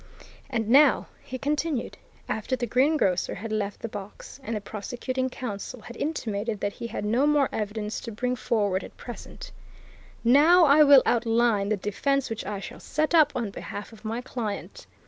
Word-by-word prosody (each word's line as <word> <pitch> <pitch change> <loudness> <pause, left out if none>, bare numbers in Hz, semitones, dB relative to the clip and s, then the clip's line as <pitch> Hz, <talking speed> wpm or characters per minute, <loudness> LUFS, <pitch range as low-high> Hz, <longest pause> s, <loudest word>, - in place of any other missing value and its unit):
"And 230 -5 -1
now," 275 +3 +5 0.2
he 255 - -6
continued, 290 -1 -2 0.3
after 220 +4 -1
the 250 -1 -2
greengrocer 250 - +2
had 225 +1 -6
left 205 -2 -2
the - - -3
box 205 +4 -9
and 230 -4 -4
the 210 - -3
prosecuting 255 +5 -3
counsel 235 -1 -6
had 240 - -10
intimated 225 -8 -3
that 205 0 -2
he 235 - -6
had 210 - -4
no 240 +7 +2
more 295 -2 +3
evidence 210 0 -3
to 230 - -7
bring 250 +4 -1
forward 205 -6 0
at - - -12
present, 240 - -9 0.7
"now 310 +9 +6
I 290 +1 +6
will 280 -3 +8
outline 230 -3 +2
the 215 - +1
defence 265 +7 -1
which 225 - -4
I 205 -1 -3
shall - - -8
set 310 +3 -1
up 310 -3 +6
on 230 -5 -2
behalf 205 +2 -7
of 220 - -15
my 225 +2 -3
client. 235 -4 -5
235 Hz, 175 wpm, -26 LUFS, 210-270 Hz, 0.7 s, will